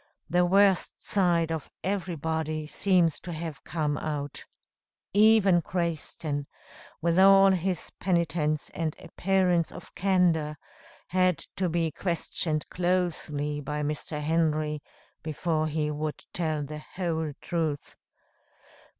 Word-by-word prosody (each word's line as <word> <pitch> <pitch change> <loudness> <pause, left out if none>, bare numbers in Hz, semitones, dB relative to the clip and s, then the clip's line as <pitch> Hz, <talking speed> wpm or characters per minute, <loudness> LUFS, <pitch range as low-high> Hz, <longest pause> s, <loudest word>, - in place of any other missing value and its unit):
The 175 +1 +4
worst 195 0 +3
side 170 -4 +1
of 160 -2 -4
everybody 160 -5 -2
seems 170 -1 +2
to 175 - -7
have 160 -3 -6
come 150 -3 -1
out. 145 -2 -4 0.7
Even 205 -4 +6
Crayston, 160 -4 -2 0.6
with 170 +1 +3
all 195 0 +8
his 185 -1 -1
penitence 165 -4 0
and 160 -2 -2
appearance 180 -1 +1
of - - -11
candor, 175 -5 +2 0.5
had 185 -2 +3 0.2
to 185 -2 +1
be 165 -1 0
questioned 160 -2 -1
closely 165 -5 -1
by 150 +1 -3
Mr. 150 +1 -3
Henry 155 -1 0 0.4
before 155 0 -1
he 150 -1 -1
would 150 0 -4
tell 155 -4 0
the 150 +2 -6
whole 160 -2 -3
truth. 160 -4 -2
165 Hz, 110 wpm, -28 LUFS, 150-180 Hz, 0.7 s, all